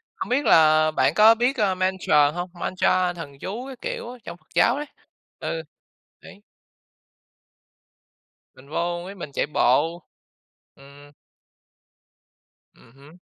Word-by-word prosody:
không - - -6
biết 270 +4 0
là 155 0 +5
bạn - - +1
có 220 +2 +6
biết, 245 +3 0
ờ, 200 -4 +1
mantra 185 -6 +2
hông? 175 +3 -5
Mantra 180 0 0
thần 140 -5 -10
chú 235 +7 -6
các 265 -2 -9
kiểu - - -5
á, 250 - -10
trong 170 - -9
Phật - - -35
giáo 240 +3 +3
đấy. 295 - -4 0.5
Ừ, - - -4 0.6
đấy. 205 - -15 2.1
Mình 130 +2 -18
vô 175 +2 -2
với 195 +3 -9
mình 160 -6 -8
chạy - - -1
bộ. 155 +4 +1 0.7
Ừm. 140 +1 -17 1.6
Ừm 115 - -21
hứm. 140 +5 -18
175 Hz, 135 wpm, -23 LUFS, 150-205 Hz, 2.1 s, có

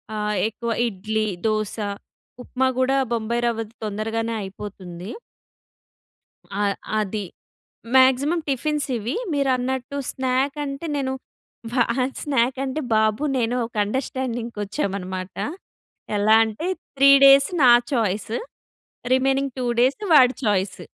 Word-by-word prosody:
ఆహ్, 210 0 -1
ఎక్కువ 235 +1 -5 0.2
ఇడ్లీ, 215 +1 -2 0.2
దోస, 215 -1 -1 0.7
ఉప్మా 260 +1 0
కూడా 265 +1 +2 0.2
బొంబాయి 235 +1 -1
రవ్వది 225 -1 -3
తొందరగానే 225 +2 -2
అయిపోతుంది. 190 -2 -8 1.5
ఆహ్, 200 -1 +1 0.2
అది. 210 0 -3 0.7
మాక్సిమమ్ 265 +6 +4
టిఫిన్స్ 295 +2 -1
ఇవి 230 +5 -3 0.2
మీరన్నట్టు 265 -1 -1
స్నాక్ 265 +2 -1
అంటే 275 +3 -5
నేను 265 -2 -1 1.1
స్నాక్ 260 -3 +1
అంటే 275 +3 -3
బాబు 215 +5 +2
నేను 235 0 0
ఒక 230 - -13
అండర్‌స్టాండింగ్‌కి 240 -2 -3
వచ్చామనమాట. 190 -4 -4 0.8
ఎలా 215 +2 +5
అంటే 220 +10 -4 0.3
త్రీ 275 +1 +7
డేస్ 275 0 +7
నా 250 - +8 0.2
చాయిస్ 215 -3 -1 0.8
రిమైనింగ్ 270 +1 +1
టూ 255 - -2
డేస్ 260 - +3
వాడి 260 -3 +6
చాయిస్. 195 -2 0
235 Hz, 105 wpm, -23 LUFS, 210-265 Hz, 1.5 s, నా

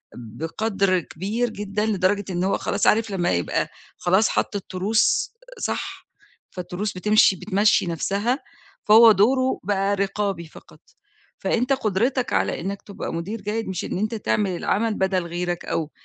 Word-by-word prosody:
بقدْر 185 - -1
كبير 205 +9 -3
جدًا 210 0 -3
لدرجة 205 -1 +1
إن 175 0 -1
هو 195 +1 +1
خلاص - - -1
عارف 225 0 +3
لمّا 180 -3 0
يبقى، 85 -1 0 0.3
خلاص 190 +5 +3
حَط - - -1
التروس، 200 +2 +1 0.3
صح، - - -4 0.4
فالتروس 185 +3 -4
بتمشِي 210 +1 +4
بتمشّي 205 +3 +2
نَفْسها، 200 - -1 0.4
فهو 225 +2 +8
دوره 255 +6 +2
بقى 200 +1 +1
رقابي 195 -3 -2
فقط، - - -16 0.6
فأنت 240 +7 +1
قُدرتك 245 +2 0
على - - 0
إنّك 195 +3 -4
تبقى 200 - -6
مدير 195 +7 -4
جيد 215 +3 -3
مش 185 -2 -3
إن - - -3
أنت 215 +4 -1
تعمل 210 -2 0
العمل 220 +5 0
بدَل 190 -3 0
غيرك 175 0 -3
أو 155 -2 -2
200 Hz, 140 wpm, -23 LUFS, 180-215 Hz, 0.6 s, فهو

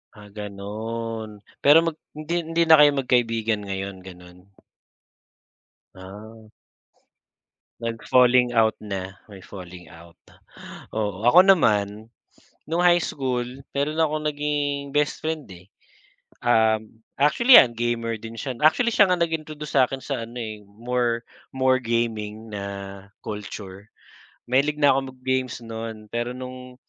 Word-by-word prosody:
Ah, 105 -1 -14
ganun. 105 +1 -6 0.2
Pero 145 +2 +8
mag 165 - -2 0.2
hindi 155 +3 -4
hindi 165 +1 0
na 160 -1 +7
kayo 145 -1 +7
magkaibigan 115 -5 0
ngayon, 95 0 -4
ganun? 90 0 -14 1.5
Ah. 105 +4 -11 1.5
Nag 115 0 -3
falling 125 -1 +4
out 110 -2 +3
na, 95 -3 -6
may 100 -2 -12
falling 90 -2 -11
out. 85 +1 -16 0.8
Oo. 105 -1 -3
Ako 125 +9 +8
naman, 110 - +2 0.6
no'ng 170 +2 +1
high 175 -1 +5
school, 125 -5 -2 0.3
meron 150 +3 -1
akong 155 -1 0
naging 145 -1 -2
best 145 -1 +1
friend, 160 -1 -3
eh. 90 0 -13 0.8
Um, 110 -1 +1 0.2
actually 235 - +5
yan, 120 -2 0
gamer 115 -1 -1
din 115 +1 -9
siya. 130 -3 -4
Actually 235 +10 +4
siya 210 - +6
nga 180 -1 +1
nag-introduce 155 -3 -3
sa 130 - +7
akin 135 - -6
sa 130 -5 -4
ano, 120 +2 -13
eh, 110 -2 -7
more 120 +3 -2 0.3
more 130 0 +3
gaming 115 -2 -3
na 100 -1 -7 0.2
culture. 105 -1 -8 0.6
Mahilig 140 +4 +2
na 145 -1 +5
ako 135 - +2 0.2
mag - - -27
games 130 -2 -1
no'n, 110 -1 -7
pero 120 +1 -2
no'ng 125 0 -9
115 Hz, 130 wpm, -24 LUFS, 105-140 Hz, 1.5 s, Pero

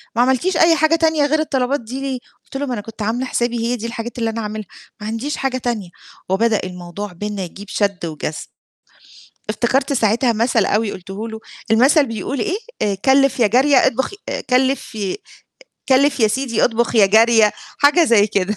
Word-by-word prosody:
"ما 235 - +3
عملتيش 265 +8 +1
أي 330 0 +5
حاجة 315 +1 +3
تانية 320 -2 +2
غير 310 +2 +1
الطلبات 275 -3 0
دي 250 +4 -7
ليه؟" 270 -2 -3 0.3
قُلت 270 - -7
له: 285 - -2
"ما 255 - -3
أنا 210 - -3
كنت 225 +1 -11
عاملة 230 +5 -1
حسابي 240 -2 -1
هي 235 +2 -1
دي 230 -1 -7
الحاجات 235 +1 -6
اللي 230 -1 0
أنا 225 +1 -4
هاعملها، 215 -2 -5 0.3
ما 210 - -5
عنديش 230 +7 -3
حاجة 265 -1 -1
تانية" 235 -7 -3 0.4
وبدأ 220 +3 +2
الموضوع 180 +2 -7
بيننا 205 +2 -4
يجيب 195 +3 -9
شد 200 -3 -1
وجذب. 155 -1 -4 1.2
افتكرت 255 +6 0
ساعتها 235 0 +2
مثل 225 -2 +1
أوي 210 0 0
قُلته 195 +5 -7
له، 220 0 -8 0.3
المثل 270 +6 +5
بيقول 230 +4 -4
إيه، 400 -1 -1 0.3
آآ 205 -1 +1
كلّف 270 0 +3
يا 230 - +5
جارية 265 +6 +3
اطبخ 265 - -1
ي - - -10 0.3
كلف 260 0 +1
ي 200 -4 -3 0.7
كلّف 275 0 +3
يا 220 - +5
سيدي 240 0 0
اطبخ 235 0 0
يا 205 -3 +6
جارية، 220 +1 +5 0.3
حاجة 295 +4 +5
زي 220 -7 +4
كده. 200 0 -1
235 Hz, 185 wpm, -19 LUFS, 210-270 Hz, 1.2 s, يا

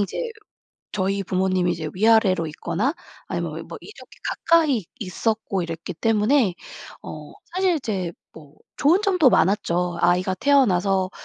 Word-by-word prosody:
이제 200 - -2 0.8
저희 195 0 -1
부모님이 185 -1 0
이제 155 -2 -4
위아래로 200 -5 +3
있거나 185 - -2 0.3
아니면 - - -4
뭐 - - -8
이렇게 425 - -14 0.3
가까이 305 - +4
있었고 205 -1 -2
이랬기 165 +1 -6
때문에 220 - +2 0.5
어 150 -1 -9 0.2
사실 370 -2 +2
이제 190 - -3 0.2
뭐 150 -2 -15 0.2
좋은 345 +8 +3
점도 365 - +4
많았죠. 180 -3 +1
아이가 180 +1 +2
태어나서 195 -7 +2
195 Hz, 300 characters per minute, -23 LUFS, 180-245 Hz, 0.8 s, 가까이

